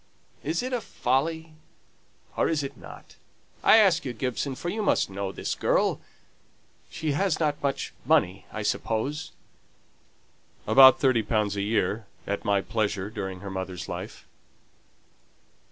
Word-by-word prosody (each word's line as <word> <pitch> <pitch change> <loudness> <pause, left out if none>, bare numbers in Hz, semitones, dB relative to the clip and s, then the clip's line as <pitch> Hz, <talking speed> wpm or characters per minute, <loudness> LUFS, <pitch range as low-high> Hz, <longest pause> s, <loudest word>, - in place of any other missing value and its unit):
Is 160 - -1
it 255 +1 -3
a 245 - 0
folly, 160 +5 -1 0.8
or - - +1
is 155 -3 0
it 140 0 -6
not? - - -13 0.5
I - - +7
ask 190 -6 +4
you, 130 - -4
Gibson, 130 +3 -3
for 175 - -4
you 215 +4 -2
must 205 - +1
know 95 0 -3
this - - -3
girl. - - +1 0.9
She 155 -1 -3
hasn't 155 -2 0
much 140 -1 -2
money, 110 - +1
I 110 - -4
suppose?" 115 +9 -2 1.3
"About 130 -1 +8
thirty 130 -4 +3
pounds 105 -1 0
a 100 - -1
year, 105 0 0 0.2
at 100 0 -3
my 100 -1 +2
pleasure 105 -2 -2
during 95 -4 -5
her 100 -1 -6
mother's 95 -2 -5
life." - - -7
130 Hz, 135 wpm, -26 LUFS, 100-155 Hz, 1.3 s, About